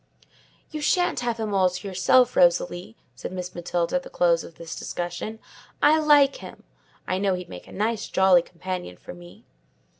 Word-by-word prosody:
"You 305 -1 -5
shan't 355 +4 +1
have 240 -2 -2
him 215 -2 -3
all 190 -2 +3
to 180 +2 -7
yourself, 205 +7 +3
Rosalie," 175 -6 +2 0.2
said - - -7
Miss 180 -1 -6
Matilda 175 +5 -1
at - - -3
the - - -12
close 170 -1 +2
of 165 - -12
this 165 0 -8
discussion; 175 +5 -5 0.4
"I 310 +1 +5
like 290 -3 +4
him: - - -12 0.4
I 185 - -1
know 195 -1 +1
he'd 180 -1 -8
make 90 - -10
a - - -14
nice, 220 +2 -2
jolly 190 -2 +4
companion 180 - -7
for - - -11
me." 175 +5 -15
185 Hz, 180 wpm, -24 LUFS, 175-225 Hz, 0.4 s, I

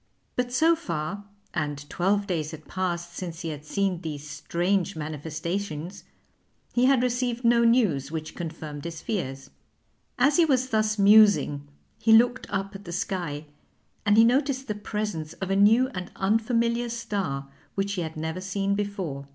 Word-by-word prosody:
But 250 0 -1
so 320 +6 +4
far 185 - -4 0.3
and 145 -3 -3
twelve 200 +6 +1
days 160 -6 -2
had 155 -1 -10
passed 175 -2 -3
since 175 -1 -6
he 165 - -3
had 150 -1 -6
seen 190 +2 -1
these 150 -3 -6
strange 175 +6 -1
manifestations 160 +4 -4 0.7
he 245 +1 +3
had 260 -2 +4
received 245 -1 -1
no 235 0 +5
news 210 - +3
which 155 -1 -5
confirmed 155 -3 -6
his 165 -2 -5
fears. 135 -11 -4 0.7
As 275 +3 +4
he 340 - +6
was 260 -4 +1
thus 215 -1 +1
musing 200 -8 +5 0.3
he 225 - +4
looked 245 +2 +4
up 195 0 -2
at 200 +1 -10
the 170 - -6
sky, 170 -4 -3 0.6
and 205 0 +4
he 225 - +9
noticed 265 +2 +2
the 210 - -1
presence 210 -6 -4
of 190 0 -4
a - - +3
new 225 +6 +5
and 185 -6 -6
unfamiliar 230 +3 +1
star, 200 -12 -3 0.3
which 200 0 -1
he 185 - -2
had 160 -1 -5
never 160 +3 -3
seen 195 +1 -1
before. 190 -9 -3
195 Hz, 160 wpm, -26 LUFS, 160-225 Hz, 0.7 s, he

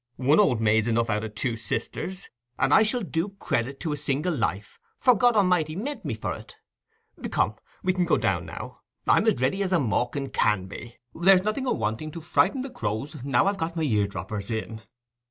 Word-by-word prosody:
One 140 +6 +4
old 130 - +4
maid's 110 0 +3
enough 115 0 +1
out 105 +1 0
o' - - -2
two 115 +2 -3
sisters; 180 - -4 0.3
and 140 - +2
I - - +7
shall 220 +2 +1
do 185 +2 -2
credit 130 -1 -1
to 160 - -2
a - - 0
single 150 +4 -1
life, 105 -5 -3 0.2
for 250 - +5
God 240 +2 +3
A'mighty 180 -6 +2
meant 280 +10 -4
me - - -2
for - - -3
it. - - -11 0.7
Come, - - +1 0.3
we 185 - +2
can 180 -1 +1
go 170 - +3
down 90 -3 0
now. - - -8 0.3
I'm - - +4
as - - +3
ready 135 +10 +1
as 190 -2 -1
a 185 - +4
mawkin 135 +1 -1
can 100 -3 +1
be—there's 125 - +1
nothing 235 +6 -1
awanting 110 - -1
to 170 - -7
frighten 195 - +2
the 270 - -7
crows, 120 - -4
now 135 +2 +2
I've 200 0 0
got 165 +1 -2
my 165 - -1
ear 105 -8 +2
droppers 100 0 -5
in." 110 0 -4
145 Hz, 200 wpm, -26 LUFS, 110-185 Hz, 0.7 s, I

